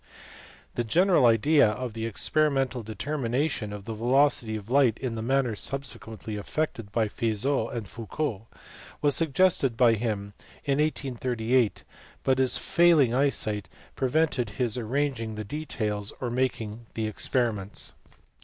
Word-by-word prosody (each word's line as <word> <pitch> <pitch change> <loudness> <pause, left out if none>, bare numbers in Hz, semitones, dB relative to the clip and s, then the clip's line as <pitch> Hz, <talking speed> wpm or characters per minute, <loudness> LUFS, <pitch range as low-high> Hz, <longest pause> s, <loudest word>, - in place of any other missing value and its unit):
The 120 - -1
general 170 - +4
idea 130 +3 +5
of 120 +2 -4
the 115 0 -3
experimental 135 +4 +1
determination 125 +1 -2
of 105 -1 -8
the 115 - -4
velocity 120 0 +2
of 110 +2 -7
light 130 -5 +4
in 130 -3 -3
the 110 - -4
manner 125 -1 +1
subsequently 110 -4 -5
effected 115 -2 -3
by 110 0 +1
Fizeau 115 +3 0
and 115 -4 -5
Foucault 115 0 -4 0.6
was 145 -1 +5
suggested 160 -6 +2
by 120 -3 +5
him 105 -3 -2 0.3
in 140 -1 +1
1838, 125 -5 0 0.4
but 130 0 +2
his 130 -1 +3
failing 165 -8 +4
eyesight 110 -8 0 0.3
pre 130 - 0
vented 140 -5 +1
his 120 -4 0
arranging 125 -2 -2
the 110 - -4
details 105 -5 -3
or 125 -2 -3
making 120 -3 -2
the 110 - -1
experiments. 110 -2 -1
120 Hz, 135 wpm, -27 LUFS, 110-140 Hz, 0.6 s, idea